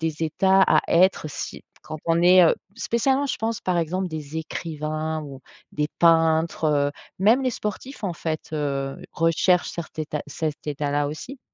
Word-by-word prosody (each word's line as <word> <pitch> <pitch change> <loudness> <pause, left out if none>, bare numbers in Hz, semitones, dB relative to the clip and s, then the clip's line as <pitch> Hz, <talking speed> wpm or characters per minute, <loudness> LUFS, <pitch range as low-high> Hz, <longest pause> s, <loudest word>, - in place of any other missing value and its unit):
des 160 -1 -2
états 190 +4 +3
à - - +5
être 175 -2 +3
si - - -6 0.2
quand 155 - -7
on 165 0 +3
est, 180 0 +7
heu, 165 - +4 0.2
spécialement, 265 +4 +1
je - - -2
pense, 225 -1 -2
par 180 -2 0
exemple, 180 +3 -1
des 155 -2 -6
écrivains 155 -1 -4
ou 135 -2 -9 0.3
des 150 0 0
peintres, 165 -1 +3
heu, 145 -1 +2 0.3
même 220 +7 +5
les 255 - +1
sportifs, 235 +4 -6
en 185 - -1
fait, 160 -2 -4
heu, 140 -2 -2
recherchent 165 +2 +2
cert 170 -2 -6
état 150 -1 -3
cet 155 +1 -4
état-là 145 0 -1
aussi. 250 - -7
160 Hz, 165 wpm, -24 LUFS, 150-185 Hz, 0.3 s, est